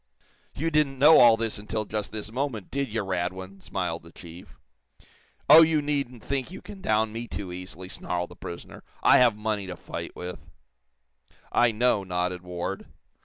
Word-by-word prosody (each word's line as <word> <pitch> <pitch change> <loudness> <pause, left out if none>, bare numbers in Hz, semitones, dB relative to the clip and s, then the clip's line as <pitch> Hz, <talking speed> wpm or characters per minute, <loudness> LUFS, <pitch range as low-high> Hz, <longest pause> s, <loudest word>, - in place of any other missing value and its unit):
"You 165 +3 -1
didn't 150 -3 +2
know 150 +4 +8
all 115 -2 +7
this 115 -2 -2
until 105 +1 -3
just 105 -1 -3
this 105 0 -5
moment, 125 -5 -3
did 140 -3 -2
you, 110 -1 -1
Radwin?" 95 +1 -4
smiled - - -3
the - - -15
chief. 85 +2 -13 0.9
"Oh, 155 +3 +10
you 160 -1 +4
needn't 140 -5 -2
think 140 0 -2
you 185 - -8
can 205 -2 -11
down 110 -3 +1
me 115 +1 -4
too 100 -4 -6
easily," 90 0 -7
snarled 90 -1 -4
the - - -11
prisoner. 85 - -9 0.2
"I - - +7
have 120 -4 +5
money 105 -2 -2
to 90 - -5
fight - - -7
with." 90 0 -6 1.1
"I 120 -1 +4
know," 110 -2 +2
nodded 90 -1 -2
Ward. 90 +2 -5
110 Hz, 170 wpm, -26 LUFS, 95-130 Hz, 1.1 s, Oh